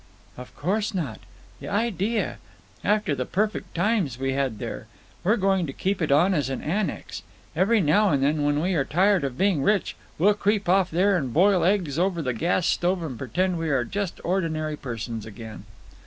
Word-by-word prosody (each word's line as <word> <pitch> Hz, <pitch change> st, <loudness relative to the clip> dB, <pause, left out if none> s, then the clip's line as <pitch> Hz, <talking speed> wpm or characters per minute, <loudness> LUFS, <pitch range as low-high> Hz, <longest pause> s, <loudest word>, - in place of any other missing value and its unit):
"Of 125 Hz, 0 st, -11 dB
course 205 Hz, +6 st, -1 dB
not. 145 Hz, -12 st, -3 dB, 0.4 s
The -, -, -8 dB
idea! 215 Hz, -1 st, -1 dB, 0.4 s
After 210 Hz, -5 st, +1 dB
the 130 Hz, -2 st, -1 dB
perfect 210 Hz, +3 st, -2 dB
times 175 Hz, -, +1 dB
we 135 Hz, 0 st, -1 dB
had 135 Hz, -5 st, -1 dB
there! -, -, -6 dB, 0.4 s
We're 215 Hz, +6 st, +3 dB
going 190 Hz, -3 st, +1 dB
to 135 Hz, -, -6 dB
keep 190 Hz, +4 st, -2 dB
it 155 Hz, -, 0 dB
on 170 Hz, +7 st, +4 dB
as 145 Hz, -6 st, 0 dB
an 135 Hz, -, -4 dB
annex. 190 Hz, +5 st, -3 dB, 0.3 s
Every 200 Hz, +6 st, +3 dB
now 190 Hz, +7 st, +3 dB
and 140 Hz, -4 st, +1 dB
then, 150 Hz, +1 st, +1 dB
when 145 Hz, 0 st, +1 dB
we 185 Hz, +3 st, 0 dB
are 150 Hz, -5 st, +2 dB
tired 185 Hz, +6 st, +2 dB
of 135 Hz, -3 st, -3 dB
being 190 Hz, -5 st, +2 dB
rich, 205 Hz, +5 st, +1 dB, 0.2 s
we'll 200 Hz, +6 st, +4 dB
creep 205 Hz, -1 st, 0 dB
off 185 Hz, +1 st, +3 dB
there 190 Hz, +4 st, +2 dB
and 135 Hz, -8 st, -1 dB
boil 185 Hz, -, +4 dB
eggs 175 Hz, -6 st, +1 dB
over 180 Hz, -2 st, 0 dB
the 130 Hz, -2 st, -1 dB
gas 170 Hz, +8 st, 0 dB
stove 180 Hz, 0 st, +1 dB
and 145 Hz, -6 st, -5 dB
pretend 175 Hz, +9 st, -1 dB
we 165 Hz, -1 st, -2 dB
are 130 Hz, -4 st, +1 dB
just 200 Hz, -, -4 dB
ordinary 160 Hz, -4 st, -1 dB
persons 115 Hz, -4 st, -6 dB
again." 110 Hz, -1 st, -9 dB
175 Hz, 190 wpm, -25 LUFS, 140-195 Hz, 0.4 s, on